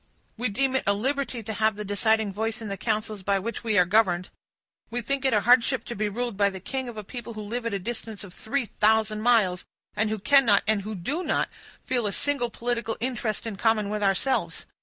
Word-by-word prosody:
"We 240 Hz, +1 st, -1 dB
deem 265 Hz, +5 st, 0 dB
it -, -, -2 dB
a 200 Hz, -, +5 dB
liberty 260 Hz, +2 st, -1 dB
to 220 Hz, +1 st, -4 dB
have 220 Hz, 0 st, +1 dB
the 210 Hz, 0 st, -6 dB
deciding 210 Hz, +1 st, +1 dB
voice 220 Hz, +2 st, -2 dB
in 220 Hz, -2 st, -6 dB
the 200 Hz, -, -2 dB
councils 215 Hz, -1 st, -2 dB
by 200 Hz, +1 st, +1 dB
which 230 Hz, +5 st, -4 dB
we 220 Hz, -2 st, +1 dB
are 180 Hz, -, +6 dB
governed. 180 Hz, -2 st, +2 dB, 0.6 s
We 240 Hz, -, -1 dB
think 275 Hz, +4 st, -2 dB
it 265 Hz, -, +3 dB
a 210 Hz, -, +3 dB
hardship 245 Hz, +3 st, +4 dB
to 235 Hz, -, -6 dB
be 210 Hz, +1 st, -1 dB
ruled 235 Hz, +1 st, -3 dB
by 200 Hz, 0 st, +3 dB
the 190 Hz, -1 st, -7 dB
king 260 Hz, +6 st, -4 dB
of 230 Hz, -, -9 dB
a 215 Hz, -, -5 dB
people 235 Hz, +2 st, -8 dB
who 215 Hz, -, -5 dB
live 230 Hz, +3 st, -3 dB
at 230 Hz, -, -3 dB
a -, -, +1 dB
distance 220 Hz, +1 st, -5 dB
of 190 Hz, -3 st, -11 dB
three 240 Hz, +6 st, -2 dB
thousand 215 Hz, 0 st, +2 dB
miles, 215 Hz, -6 st, +3 dB, 0.3 s
and 220 Hz, 0 st, +1 dB
who 220 Hz, -, -1 dB
cannot, 230 Hz, -2 st, +5 dB
and 215 Hz, -1 st, +2 dB
who 215 Hz, +2 st, -5 dB
do 275 Hz, -, -2 dB
not, -, -, 0 dB, 0.4 s
feel 245 Hz, -4 st, +1 dB
a 200 Hz, -, -2 dB
single 280 Hz, -2 st, +1 dB
political 235 Hz, -1 st, -2 dB
interest 235 Hz, -3 st, -2 dB
in 220 Hz, -4 st, -5 dB
common 215 Hz, -2 st, +1 dB
with 210 Hz, 0 st, -2 dB
ourselves. 205 Hz, +7 st, 0 dB
220 Hz, 230 wpm, -26 LUFS, 205-240 Hz, 0.6 s, are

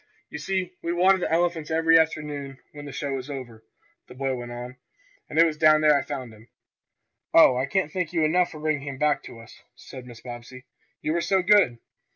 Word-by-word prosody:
"You 150 Hz, -, -6 dB
see, 185 Hz, +2 st, -2 dB
we 170 Hz, -, -2 dB
water 185 Hz, +2 st, +4 dB
the 175 Hz, -, -2 dB
elephants 165 Hz, -2 st, 0 dB
every 165 Hz, 0 st, +4 dB
afternoon 150 Hz, -4 st, -2 dB
when 145 Hz, -1 st, -10 dB
the 145 Hz, -, -8 dB
show 135 Hz, -1 st, -3 dB
is 130 Hz, +3 st, -10 dB
over," 120 Hz, -5 st, -8 dB, 0.4 s
the -, -, -13 dB
boy 135 Hz, 0 st, -2 dB
went 120 Hz, -1 st, -6 dB
on, 125 Hz, +1 st, -8 dB, 0.5 s
"and 150 Hz, -, -6 dB
it 165 Hz, -, +7 dB
was 155 Hz, -2 st, -2 dB
down 155 Hz, -1 st, +5 dB
there 150 Hz, -1 st, +5 dB
I 140 Hz, -, +2 dB
found 130 Hz, -6 st, -6 dB
him." 110 Hz, +2 st, -18 dB, 0.9 s
"Oh, 160 Hz, -6 st, +7 dB
I 130 Hz, +2 st, -1 dB
can't 190 Hz, -2 st, -1 dB
thank 180 Hz, -2 st, -3 dB
you 165 Hz, -3 st, +1 dB
enough 175 Hz, +3 st, +2 dB
for 155 Hz, -, -10 dB
bringing 150 Hz, -2 st, -2 dB
him 135 Hz, -1 st, -5 dB
back 150 Hz, +1 st, +1 dB
to -, -, -10 dB
us," 115 Hz, +2 st, -15 dB
said 130 Hz, -2 st, -11 dB
Mrs. 120 Hz, -2 st, -13 dB
Bobbsey. 120 Hz, +1 st, -10 dB, 0.4 s
"You 155 Hz, -, 0 dB
were 170 Hz, -, 0 dB
so 190 Hz, +1 st, +1 dB
good!" 185 Hz, -, +4 dB
150 Hz, 215 wpm, -25 LUFS, 130-165 Hz, 0.9 s, it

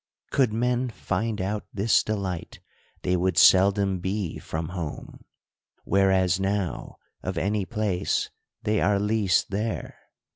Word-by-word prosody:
Could 130 Hz, -5 st, +3 dB
men 125 Hz, +3 st, 0 dB
find 110 Hz, -1 st, -2 dB
out 100 Hz, +3 st, -3 dB
this 105 Hz, +3 st, +3 dB
delight, 95 Hz, -5 st, -4 dB, 0.4 s
they 90 Hz, -, +1 dB
w^ould 90 Hz, 0 st, 0 dB
seldom 95 Hz, +1 st, +5 dB
be 95 Hz, -1 st, -3 dB
from 80 Hz, 0 st, -4 dB
home; 85 Hz, -5 st, -6 dB, 0.6 s
w^hereas 95 Hz, -2 st, +3 dB
now, 95 Hz, -2 st, -2 dB, 0.3 s
of 95 Hz, -1 st, -4 dB
any 100 Hz, +2 st, 0 dB
place, 105 Hz, -5 st, -1 dB, 0.3 s
they 105 Hz, 0 st, +1 dB
are 100 Hz, +1 st, +3 dB
least 105 Hz, -2 st, +1 dB
there. 110 Hz, +3 st, -3 dB
100 Hz, 120 wpm, -26 LUFS, 95-105 Hz, 0.6 s, seldom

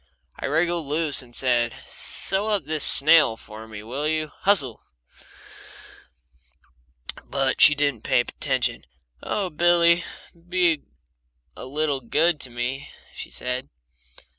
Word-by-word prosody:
I -, -, -5 dB
wriggled 165 Hz, +1 st, 0 dB
loose, 150 Hz, -1 st, 0 dB
and 125 Hz, -2 st, -16 dB
I -, -, +3 dB
said: 120 Hz, -3 st, +1 dB
"Sew 195 Hz, +3 st, 0 dB
up 205 Hz, -8 st, 0 dB
this 155 Hz, -1 st, -3 dB
sail 155 Hz, -6 st, +6 dB
for 110 Hz, 0 st, -12 dB
me, 105 Hz, -1 st, -10 dB
will 135 Hz, +7 st, -4 dB
you? 155 Hz, -1 st, -2 dB
Hustle!" 140 Hz, -, +1 dB, 2.4 s
But 135 Hz, -1 st, -1 dB
she 150 Hz, -, +8 dB
didn't 145 Hz, -6 st, -1 dB
pay 120 Hz, -, +2 dB
attention. 130 Hz, 0 st, -3 dB, 0.3 s
"Oh, 190 Hz, -3 st, -3 dB
Billy, 170 Hz, +1 st, +3 dB, 0.3 s
be 175 Hz, -2 st, -1 dB, 0.7 s
a -, -, -8 dB
little 145 Hz, 0 st, -2 dB
good 155 Hz, +6 st, +1 dB
to 130 Hz, -, -5 dB
me!" 125 Hz, +4 st, -5 dB, 0.2 s
she -, -, -9 dB
said. 125 Hz, +2 st, -5 dB
145 Hz, 125 wpm, -23 LUFS, 125-170 Hz, 2.4 s, she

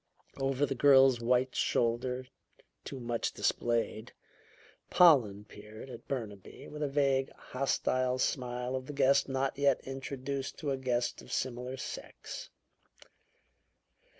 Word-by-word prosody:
Over 135 Hz, +1 st, +1 dB
the 135 Hz, -, -2 dB
girl's 135 Hz, -1 st, +6 dB
white 125 Hz, +2 st, +2 dB
shoulder, 125 Hz, +2 st, 0 dB, 0.6 s
too 135 Hz, -, -7 dB
much 120 Hz, -1 st, -2 dB
displayed, 115 Hz, -2 st, -1 dB, 0.8 s
Pollen 120 Hz, -, +5 dB
peered 105 Hz, +5 st, -11 dB
at -, -, -11 dB
Burnaby 105 Hz, -8 st, -6 dB
with 150 Hz, 0 st, -8 dB
the 150 Hz, -, +1 dB
vague, 135 Hz, -1 st, +1 dB
hostile 130 Hz, -1 st, -1 dB
smile 125 Hz, -1 st, -1 dB
of 130 Hz, -1 st, -4 dB
the 145 Hz, -, -6 dB
guest 140 Hz, 0 st, +3 dB
not 135 Hz, +1 st, -1 dB
yet 140 Hz, -2 st, +3 dB
introduced 135 Hz, 0 st, -5 dB
to 145 Hz, -3 st, -2 dB
a 135 Hz, -, 0 dB
guest 125 Hz, -2 st, -1 dB
of -, -, -13 dB
similar 125 Hz, +1 st, -3 dB
sex. -, -, -7 dB
130 Hz, 125 wpm, -31 LUFS, 120-135 Hz, 0.8 s, girl's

